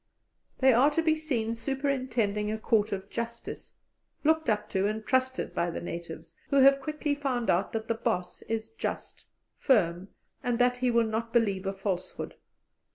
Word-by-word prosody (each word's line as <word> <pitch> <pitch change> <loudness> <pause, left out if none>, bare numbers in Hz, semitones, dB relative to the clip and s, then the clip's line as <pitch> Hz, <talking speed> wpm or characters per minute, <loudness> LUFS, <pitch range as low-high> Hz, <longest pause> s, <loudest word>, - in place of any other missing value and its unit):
They 260 -1 +6
are 255 +5 +5
to 325 +2 0
be 320 -1 +4
seen 250 -8 -1
superintending 240 -5 -1
a 220 - -1
court 220 -1 +1
of 195 -1 -4
justice, 235 0 -6 0.5
looked 315 -2 +3
up 210 -1 +1
to 195 0 +1
and 215 +1 -3
trusted 260 0 0
by 175 - 0
the 165 - -4
natives, 170 -1 -7
who - - 0
have 275 +1 +6
quickly 300 +1 -1
found 265 -5 0
out 180 +3 +1
that 220 0 -3
the - - +2
"boss" 220 -6 -2
is 225 -1 -2
just, 445 - -5 0.3
firm, 180 -7 +2 0.3
and 245 -1 0
that 245 0 +3
he 250 0 +1
will 235 -1 +3
not 225 +1 -2
believe 200 -5 +1
a 195 - -1
falsehood. 195 -2 -4
230 Hz, 170 wpm, -29 LUFS, 205-260 Hz, 0.5 s, They